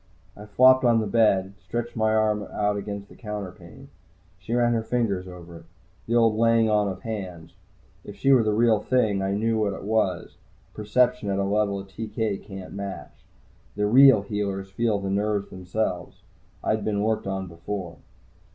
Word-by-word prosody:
I 105 +1 -11
flopped 130 +5 +5
on 120 -2 +4
the 110 - -1
bed, 100 -3 +2
stretched 120 +3 -5
my 110 -1 +1
arm 110 -1 +2
out 105 0 0
against 100 0 -5
the - - -16
counterpane. 105 +4 -8 0.5
She 110 +5 -4
ran 120 -1 +2
her 115 - 0
fingers 110 -6 -1
over 85 -2 -11
it 80 - -15 0.4
the 115 - 0
old 115 -2 +4
"laying 115 0 +3
on 105 -1 +2
of 95 -1 -6
hands." 90 -7 -6 0.5
If 105 - -10
she 135 - +2
were 130 -3 +6
the 110 -1 +1
real 110 0 +3
thing, 110 -6 +1
I 95 0 -1
knew 110 +1 0
what 105 -2 0
it - - -8
was 105 -3 -1 0.4
perception 105 0 +1
at 100 - 0
a 100 - 0
level 100 0 0
a - - -7
TK 105 +1 -4
can't 95 -2 -10
match. 100 -1 -8 0.5
The 105 0 0
real 125 -1 +6
healers 100 -2 -4
feel 110 +1 0
the 100 -1 -4
nerves 100 0 -1
themselves. 90 -1 -4 0.4
I'd 110 -1 0
been 105 -1 -1
worked 110 -2 -1
on 95 0 -3
before. 85 0 -6
105 Hz, 180 wpm, -25 LUFS, 95-110 Hz, 0.5 s, were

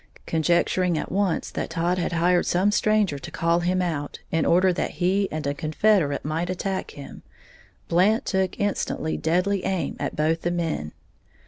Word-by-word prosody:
Conjecturing 170 +2 +1
at - - -4
once 195 -2 0
that - - -4
Todd 170 +2 0
had 170 - -2
hired 175 +1 +2
some 190 +4 +2
stranger 210 -8 +2
to 130 - -8
call 170 +1 +1
him 180 +1 0
out, 145 -5 -3
in 165 - +1
order 185 +2 +4
that - - -2
he 190 +2 +1
and 155 -1 -4
a 140 - 0
confederate 155 0 +1
might 160 +3 -2
attack 190 +1 -3
him, 140 - -10 0.7
Blant 195 +6 +3
took 190 -2 -1
instant 195 -5 -2
deadly 180 +4 +1
aim 190 -3 -1
at - - -3
both 160 +2 +1
the 175 - -1
men. 165 - -2
175 Hz, 165 wpm, -24 LUFS, 160-190 Hz, 0.7 s, order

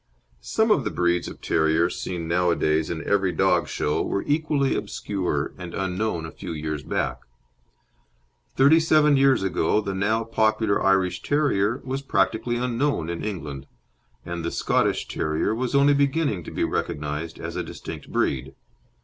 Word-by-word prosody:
Some - - +1
of - - +3
the - - -1
breeds 85 0 0
of - - -9
terriers 80 +2 +2
seen 85 -3 -4
nowadays 85 -3 +1
in 80 -1 -4
every 100 -2 +2
dog 85 - +2
show 75 - -1
were 100 - -1
equally 145 -2 +1
obscure 100 -2 -2
and 85 -1 -7
unknown 95 -2 -2
a 80 - -7
few - - -7
years 75 -1 -4
back. - - -2 1.4
Thirty 145 +5 +6
seven 155 -2 +4
years 135 -5 +4
ago 95 +2 +1
the 100 -2 -3
now 105 +4 +1
popular 110 -2 +1
Irish 95 -2 +2
Terrier 130 -6 +1
was 135 +1 -3
practically 120 -3 0
unknown 120 - -1
in 85 - -5
England, 75 -9 -5 0.6
and 85 -1 -4
the 85 - -1
Scottish - - 0
Terrier 80 +7 -1
was 125 +3 -2
only 140 +1 +5
beginning 140 - +1
to - - -7
be - - -1
recognised 75 +2 -3
as - - -6
a - - -1
distinct - - -8
breed. 65 - -1
95 Hz, 155 wpm, -24 LUFS, 85-130 Hz, 1.4 s, Thirty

